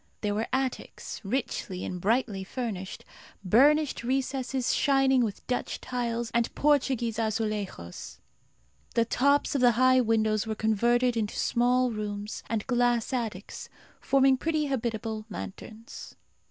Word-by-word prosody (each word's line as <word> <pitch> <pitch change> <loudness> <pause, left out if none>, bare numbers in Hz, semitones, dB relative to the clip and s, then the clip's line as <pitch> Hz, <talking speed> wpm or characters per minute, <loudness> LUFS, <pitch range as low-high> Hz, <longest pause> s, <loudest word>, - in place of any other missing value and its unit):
There 210 -1 0
were 215 +2 -1
attics, 260 0 -3
richly 200 -4 -3
and 180 -1 -5
brightly 215 -2 0
furnished; 195 -3 -5 0.4
burnished 280 - +4
recesses 260 0 -1
shining 270 -2 +3
with 210 -3 -4
Dutch 250 - -2
tiles 235 -2 -3
and 235 0 +1
Portuguese 255 -6 +1
azulejos. 215 - -3 0.8
The 230 -1 +3
tops 280 +5 +2
of 275 - 0
the 245 -1 +6
high 255 +2 +4
windows 220 -2 +1
were 220 - -2
converted 235 +3 +2
into 215 -2 -2
small 250 +1 +2
rooms 210 -1 -5
and 225 -2 -1
glass 245 -1 +1
attics, 220 -6 -4 0.3
forming 270 0 +3
pretty 310 +2 0
habitable 225 -4 -3
lanterns. 220 +2 -9
235 Hz, 125 wpm, -28 LUFS, 215-255 Hz, 0.8 s, the